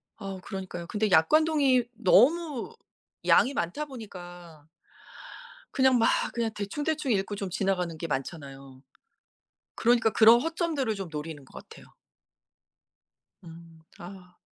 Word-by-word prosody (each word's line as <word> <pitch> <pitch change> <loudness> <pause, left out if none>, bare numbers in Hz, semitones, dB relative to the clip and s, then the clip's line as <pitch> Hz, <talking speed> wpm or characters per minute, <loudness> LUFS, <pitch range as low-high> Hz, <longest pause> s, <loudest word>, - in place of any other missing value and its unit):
아우 195 -3 -7
그러니까요. 180 -3 -7
근데 210 +2 -1
약관 180 - +5
동의 275 -6 +2
너무 280 - +2 0.5
양이 275 - +4
많다 275 - -3
보니까 175 - -11 1.1
그냥 260 -2 +3
막 230 - +3 0.3
그냥 235 -1 -1
대충대충 290 +7 -2
읽고 200 +1 -1
좀 195 -2 -5
지나가는 180 -3 -1
게 165 - -4
많잖아요. 135 -2 -7 0.9
그러니까 235 -1 +3
그런 230 +2 +6
허점들을 315 -7 -2
좀 195 -4 -6
노리는 150 -1 -7
것 - - -13
같아요. - - -14 1.6
음 165 -1 -14 0.2
아. 180 0 -12
200 Hz, 260 characters per minute, -27 LUFS, 170-255 Hz, 1.6 s, 그런